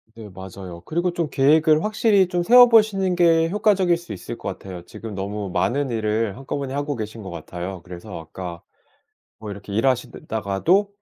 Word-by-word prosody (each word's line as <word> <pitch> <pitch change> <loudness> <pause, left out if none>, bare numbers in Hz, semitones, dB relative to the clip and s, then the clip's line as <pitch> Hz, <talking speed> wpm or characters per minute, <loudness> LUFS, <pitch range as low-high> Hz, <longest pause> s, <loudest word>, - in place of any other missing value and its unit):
네, 110 -2 -10
맞아요. 95 -1 -9
그리고 175 +2 0
좀 170 -4 -2
계획을 155 +4 +4
확실히 215 -3 +3
좀 180 -1 -1
세워보시는 215 -4 +6
게 165 -1 +4
효과적일 195 -3 +3
수 175 0 -11
있을 120 - -7
것 - - -8
같아요. 90 -3 -8
지금 110 -2 -9
너무 100 +1 -4
많은 135 +5 0
일을 110 -1 -1
한꺼번에 135 0 -4
하고 145 0 -2
계신 110 0 -6
것 95 - -8
같아요. 90 +1 -6
그래서 90 +2 -9
아까 85 +1 -8 0.8
뭐 105 -1 -7
이렇게 100 0 -8
일하시다가도 125 - 0
130 Hz, 365 characters per minute, -22 LUFS, -, 0.8 s, 세워보시는